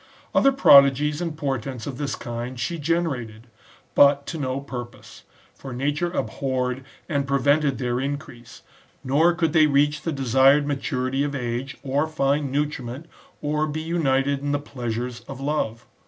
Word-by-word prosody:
Other 275 - +5
prodigies 145 - +5
and 165 -3 -3
portents 135 -4 -3
of 135 -3 -6
this 140 -2 -2
kind 120 +1 -6
she 170 +8 -2
generated; 140 -9 -2 0.5
but 140 0 +5
to 165 - -5
no 130 -1 -2
purpose; 120 -3 -9 0.3
for 135 -2 -9
nature 145 +7 -1
abhorred 130 -2 -2 0.2
and 140 -4 -1
prevented 140 +1 +2
their 125 -1 -1
increase; 135 -4 -6 0.4
nor 160 +6 +3
could 165 -2 0
they 155 -2 +6
reach 145 +1 +2
the 165 - -2
desired 135 +1 +4
maturity 135 -1 -1
of 145 0 -2
age, 125 +1 -4
or 140 +3 0
find 140 -2 0
nutriment, 140 -1 -3 0.4
or 150 +1 0
be 155 +1 -4
united 140 -4 +1
in 145 +1 -2
the - - +2
pleasures 120 -3 -5
of 135 -2 -8
love. 135 -6 -2
140 Hz, 150 wpm, -24 LUFS, 130-150 Hz, 0.5 s, they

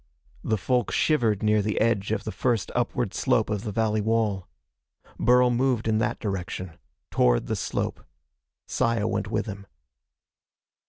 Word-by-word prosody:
The 110 - 0
folk 125 +6 0
shivered 115 -10 +2
near 105 0 +3
the 105 +1 -1
edge 110 -3 +1
of 110 -2 -1
the 110 - -4
first 120 -4 -1
upward - - -1
slope - - +1
of 105 -2 -1
the 110 - -3
valley 110 0 +1
wall. 105 -4 0 0.7
Burl 125 0 +4
moved 120 -2 +1
in 110 -1 +2
that - - 0
direction. 95 -3 -4 0.3
Toward - - +3
the - - -2
slope. - - -3 0.6
Saya 115 -3 0
went 110 -1 -1
with 110 -1 -1
him. 100 -2 -8
110 Hz, 150 wpm, -26 LUFS, 100-115 Hz, 0.7 s, Burl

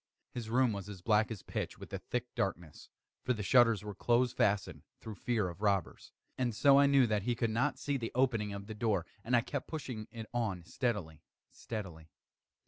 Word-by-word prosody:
His 115 -3 -5
room 125 -1 +3
was 100 0 -6
as 95 -3 -9
black 110 0 +3
as 110 -5 -6
pitch - - -4
with - - -11
the - - -3
thick 125 0 -4
darkness, 85 -5 -3 0.3
(for 125 - +1
the 105 -3 -4
shutters 115 -2 +5
were 105 -1 -5
close 120 +4 +2
fastened, 105 0 +1 0.2
through 110 - -7
fear 110 -1 0
of 90 +3 -8
robbers,) 100 -4 0 0.3
and 120 -4 0
so 140 +3 +6
I 140 - +6
knew 140 -2 +5
that 105 -2 +1
he 120 +4 0
could 115 -1 0
not 130 +4 +1
see 145 +1 -1
the 115 -3 -4
opening 115 -5 +2
of 100 0 -6
the 110 - -6
door, 105 -5 0 0.2
and 125 +2 +2
I 120 - +5
kept 140 +3 -4
pushing 130 -9 -5
it 115 -1 -7
on 105 -7 -1
steadily, 90 - -2 0.3
steadily. 90 -8 -7
110 Hz, 205 wpm, -33 LUFS, 100-125 Hz, 0.3 s, so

